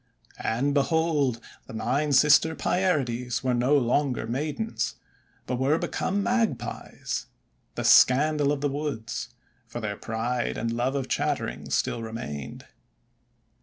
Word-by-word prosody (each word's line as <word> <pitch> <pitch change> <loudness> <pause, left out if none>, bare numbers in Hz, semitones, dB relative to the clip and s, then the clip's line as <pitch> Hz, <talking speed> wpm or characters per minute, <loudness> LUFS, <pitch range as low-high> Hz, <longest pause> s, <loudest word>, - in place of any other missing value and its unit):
And, 130 +6 0
behold, 145 -4 +1 0.3
the - - -10
Nine 135 +7 0
Sister 150 +3 +5
Pierides 125 -13 0
were 130 -1 +1
no 125 +4 +3
longer 130 0 +1
maidens, 150 - -2 0.5
but 125 0 -2
were 140 +4 +3
be - - -3
come 200 +2 -1
Magpies, 235 -1 -2 0.5
the - - -3
scandal 145 +2 +5
of 145 -2 -2
the 145 - +2
woods, 140 -5 -4 0.4
for 120 - -6
their 105 -3 -4
pride 120 +2 -2
and 115 0 -2
love 125 +3 0
of 135 -2 -2
chattering - - -2
still 115 - 0
remained. 110 - -6
135 Hz, 130 wpm, -26 LUFS, 120-150 Hz, 0.5 s, Sister